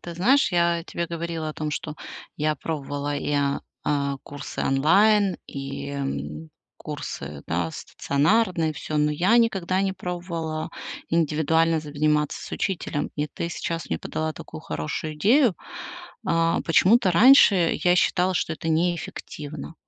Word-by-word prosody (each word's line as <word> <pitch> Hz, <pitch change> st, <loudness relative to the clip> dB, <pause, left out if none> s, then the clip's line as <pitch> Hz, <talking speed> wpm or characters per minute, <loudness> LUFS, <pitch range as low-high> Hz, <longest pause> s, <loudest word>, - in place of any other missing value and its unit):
ты 170 Hz, -, -7 dB
знаешь, 250 Hz, +11 st, +3 dB
я 170 Hz, -1 st, +2 dB
тебе 170 Hz, 0 st, -3 dB
говорила 165 Hz, -1 st, -4 dB
о -, -, -4 dB
том, 155 Hz, -1 st, -3 dB
что 150 Hz, +1 st, -4 dB, 0.4 s
я 155 Hz, 0 st, +1 dB
пробовала 145 Hz, -1 st, -3 dB
и, 145 Hz, -, -2 dB
а 140 Hz, -1 st, +1 dB, 0.2 s
а 140 Hz, -1 st, 0 dB
курсы 145 Hz, 0 st, -7 dB
онлайн, 195 Hz, +8 st, +4 dB
и, 140 Hz, 0 st, -6 dB
м, 80 Hz, -, -4 dB, 0.3 s
курсы, 70 Hz, +1 st, -6 dB
да, 85 Hz, 0 st, -1 dB
стационарные, 165 Hz, -, +1 dB
и -, -, -4 dB
всё, 155 Hz, -, -4 dB
но 150 Hz, 0 st, +3 dB
я 185 Hz, +10 st, +3 dB
никогда 190 Hz, -5 st, +1 dB
не 195 Hz, -, 0 dB
пробовала 170 Hz, -3 st, -4 dB, 0.4 s
индивидуально 160 Hz, 0 st, +2 dB
заниматься 150 Hz, 0 st, 0 dB
с -, -, -9 dB
учителем, 170 Hz, -6 st, -2 dB
и 150 Hz, 0 st, 0 dB
ты 170 Hz, +3 st, -4 dB
сейчас 165 Hz, -2 st, -4 dB
мне 80 Hz, -, -1 dB
подала 155 Hz, 0 st, -3 dB
такую -, -, -9 dB
хорошую 155 Hz, -, -4 dB
идею. 225 Hz, -, +4 dB, 0.7 s
А, 165 Hz, 0 st, +2 dB
почему-то 190 Hz, +5 st, +4 dB
раньше 200 Hz, -5 st, +6 dB
я 180 Hz, 0 st, +5 dB
считала, 180 Hz, +1 st, +2 dB
что 165 Hz, -, 0 dB
это 165 Hz, -, -5 dB
неэффективно, 160 Hz, -2 st, -3 dB
160 Hz, 140 wpm, -24 LUFS, 145-175 Hz, 0.7 s, раньше